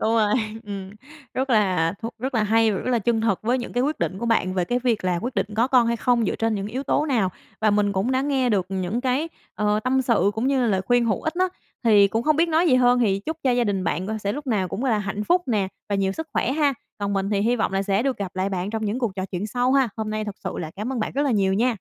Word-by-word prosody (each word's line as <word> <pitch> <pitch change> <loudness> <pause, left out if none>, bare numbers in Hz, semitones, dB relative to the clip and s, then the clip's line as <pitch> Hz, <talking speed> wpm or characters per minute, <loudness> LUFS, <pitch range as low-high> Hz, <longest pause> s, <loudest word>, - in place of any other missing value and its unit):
Đúng 220 - +1
rồi, 215 -2 +3 0.3
ừm, 195 -2 -6 0.4
rất 265 +1 -1
là 185 -7 +2
thú 230 - -2
rất 260 +2 -4
là 220 - +2
hay 225 +1 +3
và 195 - -2
rất 255 - -3
là 240 - +3
chân 225 +1 +1
thực 220 -4 +1
với 245 +4 +1
những 240 - -6
cái 245 - +1
quyết 300 +4 -1
định 190 - -2
của 235 - -3
bạn 185 -5 +1
về 180 -2 +1
cái 245 +7 0
việc 235 -6 0
là 180 -2 +1
quyết 245 +2 -3
định - - 0
có 235 - +3
con 250 -3 +4
hay 235 0 +1
không 240 0 +2
dựa - - -1
trên 225 0 0
những 200 -1 -3
yếu 250 +6 -4
tố 295 +2 +1
nào? 225 -9 +1 0.3
Và 215 -1 +3
mình 205 -1 +2
cũng 195 +5 0
đã 260 - +2
nghe 270 -3 +1
được 195 -4 +1
những 190 +4 -2
cái, 265 +5 0 0.3
ờ, 210 0 +1
tâm 260 +1 +2
sự 225 -5 +2
cũng 225 +4 -1
như 275 -1 +2
là - - +2
lời 195 -4 +1
khuyên 245 -1 +3
hữu 215 -4 0
ích 315 - -2
á, 370 +1 +2 0.4
thì 205 -3 +6
cũng 225 +3 -1
hông 305 +3 +2
biết 335 +1 +3
nói 330 +2 +3
gì 255 - +5
hơn 245 -1 +4
thì 200 -5 +2
chúc 320 +10 -4
cho 260 - +4
gia 245 -1 +2
đình 195 -3 -1
bạn 185 +2 -1
c 220 0 -3
sẽ 200 0 -1
lúc 290 +2 -6
nào 200 -7 0
cũng 235 +10 -4
là 225 -5 +2
hạnh 205 +1 -3
phúc 355 +6 +3
nè 205 -5 +1 0.2
và 205 - -1
nhiều 195 -1 +1
sức 320 +6 -6
khỏe 260 - 0
ha! 290 -2 +2 0.2
Còn 200 0 -2
mình 195 +1 -1
thì 200 -1 +1
hi 240 +3 +2
vọng 220 - -1
là 195 0 +1
sẽ 200 +2 +1
được 270 -1 0
gặp 190 -2 -6
lại 190 +1 0
bạn 190 0 -3
trong 220 0 -3
những 215 +4 -1
cuộc 235 -7 -2
trò 185 - -2
chuyện 195 +2 -4
sau 245 +3 0
ha. 270 -2 +3
Hôm 220 -1 -3
nay 215 0 -2
thực 205 -2 -5
sự - - -2
là 160 -3 -5
cảm 215 +6 -3
ơn 250 - -2
bạn 215 - -2
rất 280 - 0
là 285 - +1
nhiều 195 -3 +2
nha. 225 +5 +2
220 Hz, 310 wpm, -23 LUFS, 200-255 Hz, 0.4 s, thì